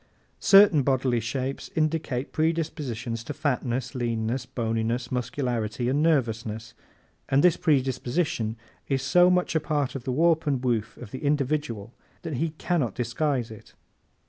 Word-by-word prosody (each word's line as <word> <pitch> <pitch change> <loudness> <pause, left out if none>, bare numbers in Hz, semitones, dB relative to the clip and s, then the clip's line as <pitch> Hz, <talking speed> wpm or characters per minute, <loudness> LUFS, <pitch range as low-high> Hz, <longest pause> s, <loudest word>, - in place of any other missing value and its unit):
Certain 195 -6 +7
bodily 130 -2 +1
shapes 130 +4 -3
indicate 155 -5 -1
predispositions 145 -8 -2
to - - -6
fatness, 130 -4 -1
leanness, 120 0 -2
boniness, 115 0 -2
muscularity 120 -2 -2
and 140 +3 +1
nervousness, 115 -8 0 0.6
and 135 +1 +3
this 180 -2 +6
predisposition 130 -3 0 0.3
is 135 -1 0
so 175 +5 +5
much 180 -1 +1
a 160 - +3
part 150 -3 -1
of 135 - -6
the 130 - -2
warp 160 +3 +2
and 130 -3 0
woof 115 -4 -1
of 120 -5 -10
the 130 - -7
individual 140 -6 -1 0.3
that 155 -6 -3
he 165 +5 0
can 175 +1 0
not 120 -8 -1
disguise 125 0 -1
it. 110 - -13
130 Hz, 145 wpm, -26 LUFS, 120-150 Hz, 0.6 s, Certain